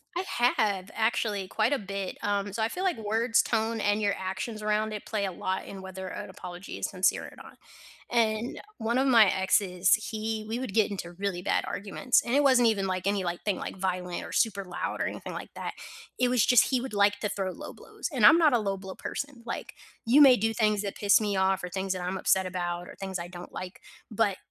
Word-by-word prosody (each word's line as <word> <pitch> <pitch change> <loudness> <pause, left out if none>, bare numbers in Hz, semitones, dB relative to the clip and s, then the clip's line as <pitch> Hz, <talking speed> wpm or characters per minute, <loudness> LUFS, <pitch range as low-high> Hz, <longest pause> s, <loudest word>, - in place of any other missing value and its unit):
I 360 - -1 0.3
have, 200 -3 0
actually 220 -3 0
quite 220 +7 +1
a - - +2
bit, 195 -1 -5
um, 205 0 0
so 220 +3 -2
I 220 - +1
feel 360 +9 -4
like 370 -8 +1
words, 225 +2 +2
tone, 225 0 0
and 205 0 +1
your 200 -1 +1
actions 200 +4 -4
around 215 +1 0
it 210 - -6
play 210 -2 -1
a 190 - -2
lot 185 +2 -3
in 195 -1 -8
whether 190 0 -7
an - - -6
apology 180 +1 -8
is - - -2
sincere 190 -1 +1
or - - -11
not. - - -13 0.5
And 225 0 0 0.2
one 230 +2 0
of 265 - +3
my 235 -5 +7
exes, 190 -1 +2
he 215 0 -4
we 225 +2 -2
would 255 -6 -5
get 220 -1 +3
into 185 -4 -5
really 195 -3 -2
bad - - +1
arguments, 205 +5 0
and 235 - -2
it 285 - +5
wasn't 255 -4 +5
even, 200 -3 0
like, 185 -1 -2
any, 200 -1 +1
like, 175 -1 -4
thing, 205 -3 0
like, - - -6
violent 180 -1 -2
or - - -8
super 205 -4 +1
loud 180 -2 -4
or - - +1
anything - - -5
like - - -8
that. - - -5 0.4
It 250 0 +2
was 245 -3 +3
just 245 -3 +5
he 260 - +2
would, 265 -3 -6
like, 205 0 +3
to 210 - -2
throw 195 -2 -2
low - - -9
blows, - - -7
and 250 -7 +3
I'm 260 - +9
not 310 -5 +4
a 240 - +4
low 195 -2 -2
blow 190 0 -8
person, 280 -4 -6
like, 230 - -5 0.3
you 255 +6 +6
may 270 -3 +9
do 225 +2 +1
things 215 -2 +2
that 200 -2 -4
piss 205 -1 +4
me 205 -2 -1
off 190 0 +1
or 180 - -4
things 190 +1 -2
that 185 - -5
I'm 180 +2 -2
upset 190 0 +2
about 175 -1 -3
or - - -11
things 190 -1 -4
I 170 - -5
don't 175 0 -10
like 185 +1 -7 0.3
but 215 -3 +1
205 Hz, 235 wpm, -28 LUFS, 190-225 Hz, 0.5 s, I'm